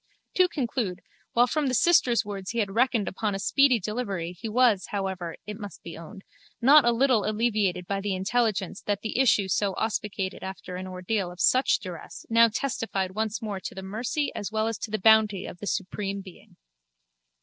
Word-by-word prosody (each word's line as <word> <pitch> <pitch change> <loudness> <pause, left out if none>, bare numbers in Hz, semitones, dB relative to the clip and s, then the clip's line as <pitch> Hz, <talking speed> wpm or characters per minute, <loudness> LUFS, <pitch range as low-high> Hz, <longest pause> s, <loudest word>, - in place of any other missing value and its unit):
To 365 -1 +4
conclude, 235 - -3 0.3
while 240 +1 +5
from 290 +3 -1
the 255 - +1
sister's 250 -8 +4
words 195 -2 -6
he 235 - -4
had 205 -4 0
reckoned 235 -3 +2
upon 205 +1 -2
a - - -1
speedy 270 +3 +3
delivery 200 -5 -3
he 180 +5 -7
was, 220 -5 +3
however, 190 -4 -3
it 210 0 -7
must 205 -4 -9
be 170 - -8
owned, 170 +5 -11 0.4
not 280 +3 +7
a 240 - +5
little 240 -2 +3
alleviated 210 -5 0
by 195 +1 -2
the 200 -1 -1
intelligence 200 -1 -1
that 205 -1 -2
the 220 +3 -2
issue 220 -7 +4
so 190 +1 0
auspicated 210 -3 -3
after 190 -1 -7
an 185 +1 -5
ordeal 185 +1 -2
of 175 - -13
such 255 +8 +4
duress 180 -4 -9
now 230 0 +7
testified 220 -5 -2
once 220 +3 -3
more 205 -3 -3
to - - -7
the 190 - -7
mercy 235 +9 -2
as 205 - -5
well 215 0 0
as 225 -1 -3
to - - -5
the 215 - -1
bounty 215 -2 +4
of 175 - -9
the 205 - -6
Supreme 200 0 -3
Being. 190 -2 -15
210 Hz, 195 wpm, -26 LUFS, 190-235 Hz, 0.4 s, not